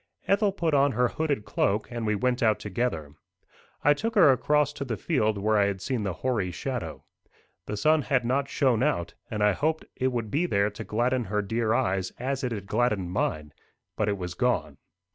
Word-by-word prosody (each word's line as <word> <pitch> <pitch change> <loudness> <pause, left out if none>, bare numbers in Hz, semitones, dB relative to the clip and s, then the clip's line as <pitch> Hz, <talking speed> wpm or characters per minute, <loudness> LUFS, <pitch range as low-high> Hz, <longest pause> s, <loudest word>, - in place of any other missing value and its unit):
Ethel 200 +1 +3
put 170 -5 -1
on 140 -1 +4
her 125 +1 +2
hooded 145 -9 -2
cloak, 105 0 0
and 120 -2 -3
we 105 - +2
went 125 +4 0
out 110 -2 +3
together. 95 -8 -3 0.7
I 145 - +6
took 225 +9 -3
her 175 -9 +7
across 150 +3 +2
to 140 - -5
the 120 -5 -3
field 110 -10 0
where 105 +1 +2
I 100 - +4
had 100 -1 -2
seen 120 +4 -2
the 100 -3 -2
hoary 110 -8 +1
shadow. 85 - -5 0.6
The 105 - -3
sun 155 +8 +3
had 130 -3 0
not 135 +3 0
shone 125 -5 +2
out, 130 - 0 0.2
and 105 -1 -1
I 105 - +5
hoped 155 +9 -1
it 130 - 0
would 115 -4 -3
be 170 +5 +1
there 100 -6 +1
to 105 - -7
gladden 120 +2 0
her 105 +1 -1
dear 110 +2 0
eyes 95 0 0
as 135 +2 -2
it 125 - -1
had 100 -4 -4
gladdened 105 -5 0
mine; 75 -6 -2 0.4
but 105 -1 0
it 100 - -1
was 90 -2 -5
gone. 90 - -1
115 Hz, 205 wpm, -27 LUFS, 100-135 Hz, 0.7 s, her